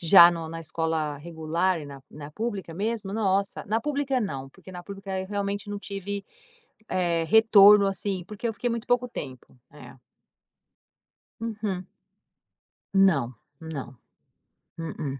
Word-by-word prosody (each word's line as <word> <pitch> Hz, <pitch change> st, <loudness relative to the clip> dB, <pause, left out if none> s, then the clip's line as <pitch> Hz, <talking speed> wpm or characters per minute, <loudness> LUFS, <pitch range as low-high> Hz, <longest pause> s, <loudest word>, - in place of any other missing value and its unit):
já 170 Hz, 0 st, +9 dB
no 165 Hz, -2 st, -4 dB
na 165 Hz, +1 st, -6 dB
escola 160 Hz, -2 st, -2 dB
regular 165 Hz, +3 st, -1 dB
e 145 Hz, -, -8 dB
na 140 Hz, -1 st, -10 dB
na 150 Hz, 0 st, -9 dB
pública 205 Hz, -3 st, -4 dB
mesmo. 205 Hz, +2 st, -2 dB
Nossa, 200 Hz, -2 st, 0 dB
na 220 Hz, +3 st, +1 dB
pública 280 Hz, -2 st, 0 dB
não, 135 Hz, -, -4 dB
porque 185 Hz, -, -14 dB
na 180 Hz, -1 st, -8 dB
pública 195 Hz, 0 st, -5 dB
eu 190 Hz, -, -5 dB
realmente 200 Hz, +1 st, -3 dB
não 205 Hz, -, -3 dB
tive, 200 Hz, 0 st, -5 dB, 0.6 s
eh, 170 Hz, -2 st, +1 dB
retorno, 210 Hz, 0 st, +7 dB
assim, 195 Hz, -1 st, -2 dB
porque 210 Hz, +3 st, -5 dB
eu -, -, -1 dB
fiquei 245 Hz, +3 st, -2 dB
muito 235 Hz, 0 st, -3 dB
pouco 245 Hz, 0 st, +2 dB
tempo, 130 Hz, -, -8 dB
eh. -, -, -13 dB, 1.4 s
Uhum. 215 Hz, -5 st, -3 dB, 1.1 s
Não, 165 Hz, -11 st, +4 dB, 0.3 s
não, 140 Hz, -6 st, -7 dB, 0.8 s
mm-mm. 150 Hz, -4 st, -4 dB
190 Hz, 140 wpm, -26 LUFS, 160-210 Hz, 1.4 s, já